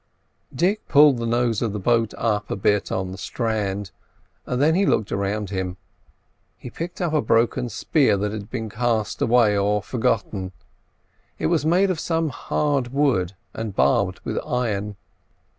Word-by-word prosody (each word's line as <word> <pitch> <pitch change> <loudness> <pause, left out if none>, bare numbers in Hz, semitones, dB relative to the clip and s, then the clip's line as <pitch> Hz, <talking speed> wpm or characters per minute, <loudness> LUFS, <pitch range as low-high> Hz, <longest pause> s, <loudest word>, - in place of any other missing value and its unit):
Dick 185 +10 0
pulled 145 -2 +6
the 115 - -2
nose 120 -2 +1
of 115 -4 -1
the 105 - -3
boat 115 +2 +1
up 110 -2 -1
a - - -1
bit 100 +1 +1
on 95 -1 -2
the 95 - -8
strand, 105 -4 -2 0.6
then 140 +6 +2
he 190 +4 +2
looked 110 - +1
around 100 0 -2
him. 95 -1 -3 0.8
He 125 - -9
picked 170 +6 -6
up 170 -3 -1
a 155 - +3
broken 120 +1 +1
spear 135 -4 +2
that 105 +1 -1
had 105 -1 -6
been 115 -2 -4
cast 115 0 -1
away 115 -3 +4
or 100 0 +1
forgotten; 105 -6 -1 0.8
it - - -3
was 150 - +1
made 185 +4 +3
of 170 - -3
some 165 -1 0
hard 140 -1 -1
wood 130 -11 +1 0.2
and 110 -3 -5
barbed 95 -2 +2
with - - -2
iron. 105 -4 -2
115 Hz, 160 wpm, -23 LUFS, 100-135 Hz, 0.8 s, pulled